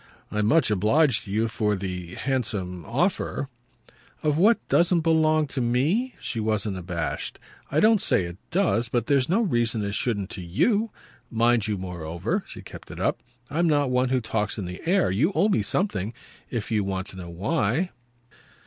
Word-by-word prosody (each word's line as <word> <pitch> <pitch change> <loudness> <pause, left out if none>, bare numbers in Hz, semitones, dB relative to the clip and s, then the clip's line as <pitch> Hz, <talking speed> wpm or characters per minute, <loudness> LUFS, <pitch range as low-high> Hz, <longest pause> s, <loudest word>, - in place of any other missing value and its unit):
"I'm 105 0 +1
much 155 -3 +4
obliged 110 - +3
to 100 - -8
you 110 +3 +1
for 105 -2 0
the 90 -2 -5
handsome 105 -9 -2
offer 140 - -1 0.4
" - - -28
"Of 150 -1 +2
what 210 +8 +3
doesn't 170 0 +3
belong 155 -1 +3
to 135 - -2
me?" 150 - +1
She 115 - -4
wasn't 110 -2 -1
abashed. 85 -2 -3 0.3
"I 145 - +1
don't 220 -2 +5
say - - +3
it 85 +1 -6
does 160 - +1
but 120 -1 0
there's 135 0 +2
no 195 +7 +3
reason 120 - 0
it 100 - -3
shouldn't 100 -4 -1
to 95 - -5
YOU. 205 - +1 0.4
Mind 115 -1 +2
you 105 -2 -1
moreover" 85 -3 -3
she - - -10
kept - - -11
it - - -8
up - - 0 0.3
"I'm 170 +4 +2
not 145 -4 +2
one 125 0 +2
who 130 -1 +1
talks 110 -2 -2
in 100 - -3
the 90 +1 -7
air. 190 0 +3
And 95 - -1
you 160 - +2
owe 210 - +3
me 195 - +2
something 110 - -1 0.3
if 115 -2 -4
you 105 -2 +2
want 95 -1 -2
to - - -8
know 90 -2 -7
why." 125 - 0
115 Hz, 185 wpm, -25 LUFS, 100-155 Hz, 0.4 s, don't